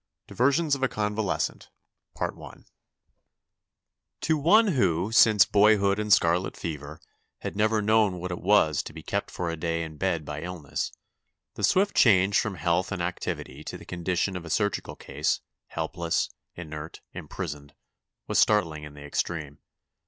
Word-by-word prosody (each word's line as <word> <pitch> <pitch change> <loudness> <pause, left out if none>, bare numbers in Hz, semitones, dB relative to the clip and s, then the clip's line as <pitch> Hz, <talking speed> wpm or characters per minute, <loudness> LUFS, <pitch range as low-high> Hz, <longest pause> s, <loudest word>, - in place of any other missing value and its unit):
DIVERSIONS 140 +5 +1
OF 140 - 0
A 135 - +3
CONVALESCENT 105 -2 -2 2.5
To 160 - +2
one 200 +10 +5
who, 95 - +1
since 110 -3 +6
boyhood 100 -1 +4
and 105 0 -2
scarlet 90 0 +3
fever, 75 -1 -6 0.4
had - - -5
never 110 +1 +2
known 105 -3 +3
what 90 +1 -4
it 90 - -5
was 90 -7 +3
to - - -10
be - - -10
kept - - -2
for 85 -2 -3
a - - -3
day 85 0 -2
in 80 -2 -8
bed 85 -4 -1
by 75 0 -5
illness, 85 -5 -4 0.6
the - - -7
swift 200 +2 +3
change 100 -3 +5
from 105 -3 -2
health 85 +3 0
and 95 -3 -2
activity 75 -4 -4
to - - -6
the - - -13
condition 90 +2 -1
of 90 - -5
a 80 - -9
surgical 105 +6 -1
case, - - -2 0.3
helpless, - - -2 0.2
inert, 80 -1 -8
im - - -8
prisoned, 75 -5 -6 0.5
was - - +1
startling 80 -8 +2
in 75 -1 -10
the 70 - -11
extreme. 75 -1 -3
90 Hz, 150 wpm, -27 LUFS, 80-105 Hz, 2.5 s, since